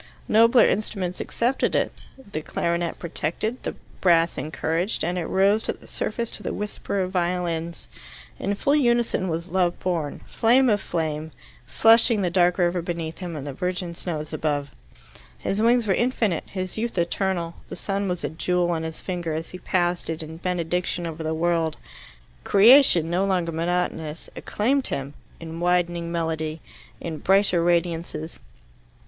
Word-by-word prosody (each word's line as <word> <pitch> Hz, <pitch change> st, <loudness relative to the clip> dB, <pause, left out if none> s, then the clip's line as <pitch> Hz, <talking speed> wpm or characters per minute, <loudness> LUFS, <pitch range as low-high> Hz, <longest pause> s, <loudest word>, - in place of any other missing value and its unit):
Nobler 230 Hz, +3 st, +6 dB
instruments 195 Hz, -3 st, -1 dB
accepted 245 Hz, +3 st, 0 dB
it, -, -, +1 dB, 0.4 s
the 155 Hz, -, -3 dB
clarionet 170 Hz, +2 st, -1 dB
protected, 175 Hz, +8 st, -2 dB
the -, -, -4 dB, 0.3 s
brass 170 Hz, -2 st, +4 dB
encouraged, 165 Hz, +5 st, -1 dB
and 175 Hz, +2 st, -1 dB
it 175 Hz, -3 st, -2 dB
rose 200 Hz, +3 st, +3 dB
to -, -, -2 dB
the -, -, -17 dB
surface 235 Hz, +1 st, -3 dB
to -, -, -6 dB
the -, -, -3 dB
whisper 205 Hz, -1 st, -3 dB
of 185 Hz, -, -4 dB
violins. 170 Hz, -2 st, -2 dB, 0.5 s
In 200 Hz, +1 st, -1 dB
full 280 Hz, +8 st, +2 dB
unison 240 Hz, -8 st, +2 dB
was 170 Hz, +2 st, -3 dB
Love 180 Hz, -1 st, +1 dB
born, 165 Hz, -5 st, -2 dB
flame 245 Hz, +3 st, +3 dB
of 205 Hz, -, +2 dB
the -, -, -13 dB
flame, 160 Hz, -2 st, -2 dB, 0.4 s
flushing 225 Hz, -, +5 dB
the 175 Hz, -, 0 dB
dark 175 Hz, 0 st, +3 dB
river 175 Hz, -1 st, +1 dB
beneath 165 Hz, -2 st, -4 dB
him 175 Hz, -3 st, -5 dB
and 145 Hz, -2 st, -5 dB
the 140 Hz, -, -5 dB
virgin 180 Hz, +3 st, -3 dB
snows 160 Hz, -3 st, -5 dB
above. 145 Hz, -2 st, -1 dB, 0.7 s
His 200 Hz, +2 st, -1 dB
wings 235 Hz, +1 st, +4 dB
were 195 Hz, -, +2 dB
infinite, 225 Hz, -6 st, 0 dB
his 185 Hz, +1 st, -4 dB
youth 230 Hz, -2 st, -3 dB
eternal; 170 Hz, 0 st, 0 dB, 0.2 s
the -, -, -5 dB
sun 200 Hz, 0 st, -2 dB
was 180 Hz, -3 st, -3 dB
a 145 Hz, -, -1 dB
jewel 175 Hz, +3 st, 0 dB
on 165 Hz, -2 st, -1 dB
his 160 Hz, 0 st, -6 dB
finger 175 Hz, -3 st, -3 dB
as 160 Hz, +1 st, -4 dB
he 185 Hz, -, -8 dB
passed 175 Hz, -2 st, 0 dB
it 160 Hz, 0 st, -2 dB
in 160 Hz, +1 st, -8 dB
benediction 180 Hz, 0 st, -1 dB
over 165 Hz, -1 st, -5 dB
the 160 Hz, 0 st, -1 dB
world. 165 Hz, -1 st, 0 dB, 0.7 s
Creation, 210 Hz, -, +6 dB
no 180 Hz, +2 st, +2 dB
longer 180 Hz, -4 st, 0 dB
monotonous, 165 Hz, -2 st, -2 dB
acclaimed 260 Hz, +6 st, 0 dB
him, 140 Hz, +1 st, -4 dB, 0.3 s
in 165 Hz, 0 st, -7 dB
widening 175 Hz, -1 st, +1 dB
melody, 160 Hz, -1 st, -2 dB, 0.4 s
in 160 Hz, -2 st, -5 dB
brighter 190 Hz, -3 st, +3 dB
radiances. 170 Hz, -2 st, -1 dB
175 Hz, 160 wpm, -24 LUFS, 165-195 Hz, 0.7 s, Nobler